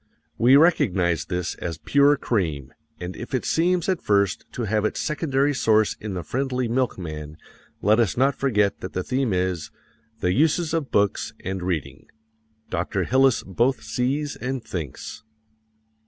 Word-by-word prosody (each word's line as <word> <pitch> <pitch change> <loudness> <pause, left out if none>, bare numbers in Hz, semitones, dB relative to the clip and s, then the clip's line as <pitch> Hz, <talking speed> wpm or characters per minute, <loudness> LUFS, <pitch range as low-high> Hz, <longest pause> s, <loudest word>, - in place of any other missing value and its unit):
We 125 +3 +6
recognize 90 - +3
this 90 -2 -2
as 85 -3 -4
pure 140 - +4
cream, 80 - -2 0.3
and 90 +1 -6
if 120 - -5
it 130 - -2
seems 175 +1 +1
at 185 -3 0
first 100 -2 +1
to 120 - -3
have 105 0 0
its 110 - -1
secondary 145 -2 0
source 110 -5 +2
in 105 -3 -4
the 90 - -4
friendly 130 - -1
milkman, 85 - -3 0.5
let 110 +3 +4
us 115 -3 +1
not 135 +3 +3
forget 105 -8 +1
that 95 - -7
the 95 - -2
theme 130 0 0
is 90 -4 -1 0.5
"The 90 - +1
Uses 160 - +2
of 160 -5 -1
Books 100 -1 +1
and 95 0 -3
Reading." 90 -5 -4 0.6
Dr. 90 +2 -1
Hillis 130 +3 +3
both 120 +7 0
sees 140 +4 -1
and 130 -1 -4
thinks. 80 +1 -6
110 Hz, 155 wpm, -24 LUFS, 90-135 Hz, 0.6 s, We